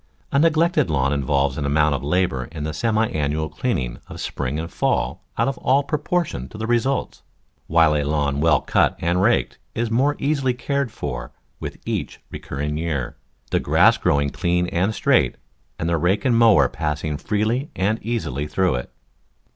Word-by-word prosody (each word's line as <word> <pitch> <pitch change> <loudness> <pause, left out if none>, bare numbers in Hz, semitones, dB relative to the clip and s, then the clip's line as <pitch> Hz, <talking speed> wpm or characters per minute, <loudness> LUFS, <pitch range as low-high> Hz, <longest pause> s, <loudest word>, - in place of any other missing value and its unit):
A 140 - +3
neglected 165 - +3
lawn 70 -2 +1
involves 70 0 0
an 70 - -2
amount 75 +1 +3
of 70 - -3
labour 75 -5 0
in 80 +1 -7
the 75 +1 -3
semi 110 +5 +1
annual 75 +1 -1
clean 120 +10 -1
ing - - -4
of - - -9
spring 70 +2 -3
and 80 +1 -4
fall - - -1
out - - +2
of 135 - -2
all 135 +3 +3
proportion 150 - -2
to - - -10
the 110 - -3
re 120 +1 +3
sults, 135 +3 -2 0.5
while 80 -1 +4
a 75 - +1
lawn 70 -1 0
well 75 -4 +4
cut - - +2
and 85 +2 0
raked 95 - +1 0.2
is 115 -1 -1
more 135 +5 +2
easily 140 -3 0
cared 140 0 -1
for - - -5 0.3
with - - -6
each - - -3
recurring 75 +2 -4
year, 75 -6 -2 0.4
the - - +2
grass - - +4
growing 70 0 +1
clean 90 0 0
and 95 +5 0
straight, - - +2 0.4
and 80 - -2
the 85 0 +1
rake 95 +6 +1
and 125 -3 +3
mower 110 - +6
passing 75 +1 -3
freely 110 - -1
and 105 +4 0
easily 80 - -2
through 90 +4 +1
it. 60 0 -4
85 Hz, 180 wpm, -22 LUFS, 70-115 Hz, 0.5 s, mower